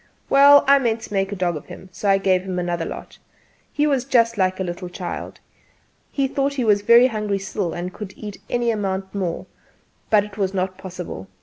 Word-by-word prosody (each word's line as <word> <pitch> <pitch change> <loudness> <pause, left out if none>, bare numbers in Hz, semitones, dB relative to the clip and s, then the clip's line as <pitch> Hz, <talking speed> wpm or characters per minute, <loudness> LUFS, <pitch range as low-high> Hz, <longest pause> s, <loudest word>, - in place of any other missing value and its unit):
Well, 285 +1 +8
I 280 0 +6
meant 230 -3 0
to 210 - -9
make 195 0 0
a - - -3
dog 180 -3 -1
of 150 - -8
him, 190 - -11
so 200 - -2
I 195 - +5
gave 185 -1 +2
him 185 -1 -5
another 175 -2 -2
lot. - - -8 0.5
He 295 - +1
was 275 -4 +1
just 230 -3 +2
like 185 -2 0
a - - 0
little 180 0 -5
child 180 0 -6 0.7
he 275 -1 0
thought 275 +1 -1
he 260 - -1
was 205 -2 +3
very 235 +4 +6
hungry 210 -5 -1
still 195 -2 -3
and 180 +1 -5
could 205 -3 -8
eat 210 -2 -8
any 240 -1 +1
amount 195 -3 -3
more; 185 -4 -3 0.6
but 210 -2 +4
it 210 0 -11
was 195 -1 -1
not 185 0 -2
possible. 180 - -7
200 Hz, 210 wpm, -22 LUFS, 185-230 Hz, 0.7 s, Well